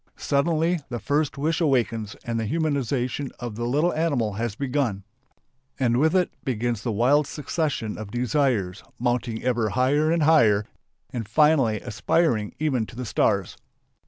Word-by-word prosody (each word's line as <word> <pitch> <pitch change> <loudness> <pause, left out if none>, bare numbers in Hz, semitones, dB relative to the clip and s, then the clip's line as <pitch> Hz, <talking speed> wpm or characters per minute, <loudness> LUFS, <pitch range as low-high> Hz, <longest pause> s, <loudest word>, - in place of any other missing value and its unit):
Suddenly 165 +4 +1
the 120 - -3
first 145 +4 -1
wish 155 +4 0
awakens 120 -6 0
and 115 -1 -2
the 110 - -2
humanization 140 -3 -1
of 120 -3 -5
the 120 +2 -4
little 150 +8 +1
animal 140 -10 0
has 115 +1 -3
begun. 130 -7 -1 0.8
And 120 -2 +2
with 160 +6 +3
it 180 -1 +2
begins 120 -4 -1
the 115 - -2
wild 135 +7 +3
succession 150 -8 -3
of 110 -2 -7
desires, 120 -6 0 0.2
mounting 120 -2 -1
ever 120 -3 +1
higher 140 +7 +2
and 165 -2 +2
higher 110 -10 +4 0.5
and 115 -4 -5
finally 135 -5 +3
aspiring 120 -2 0
even 135 -8 0
to - - -12
the 125 +1 -5
stars. 100 -3 0
125 Hz, 150 wpm, -24 LUFS, 115-150 Hz, 0.8 s, higher